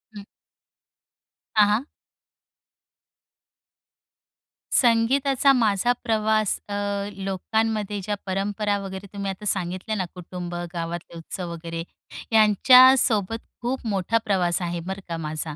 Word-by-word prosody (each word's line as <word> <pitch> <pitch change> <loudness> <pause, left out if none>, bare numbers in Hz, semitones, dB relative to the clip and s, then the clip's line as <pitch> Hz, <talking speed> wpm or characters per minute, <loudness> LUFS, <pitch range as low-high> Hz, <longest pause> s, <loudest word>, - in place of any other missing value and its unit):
हं. 200 - -8 1.3
हां, 210 -1 +6
हां. 215 +6 +1 2.9
संगीताचा 265 +3 +3
माझा 225 -1 +2
प्रवास 215 -2 +1
अ, 205 - -4 0.5
लोकांमध्ये 210 +1 -1
ज्या 205 +1 -2
परंपरा 205 +2 -1
वगैरे 195 0 -7
तुम्ही 200 -1 -3
आता 210 +3 -9
सांगितल्या 185 +2 -2
ना, 185 -3 -1
कुटुंब, 180 0 -7 0.2
गावातले 170 0 -5
उत्सव 170 +1 -6
वगैरे 165 0 -6 0.5
यांच्यासोबत 225 0 +5 0.2
खूप 245 +1 -3
मोठा 200 +2 +1
प्रवास 180 -3 +1
आहे 175 0 -2
बरं 190 +3 -6
का 165 - -3
माझा. 155 -1 -4
200 Hz, 105 wpm, -24 LUFS, 180-220 Hz, 2.9 s, हां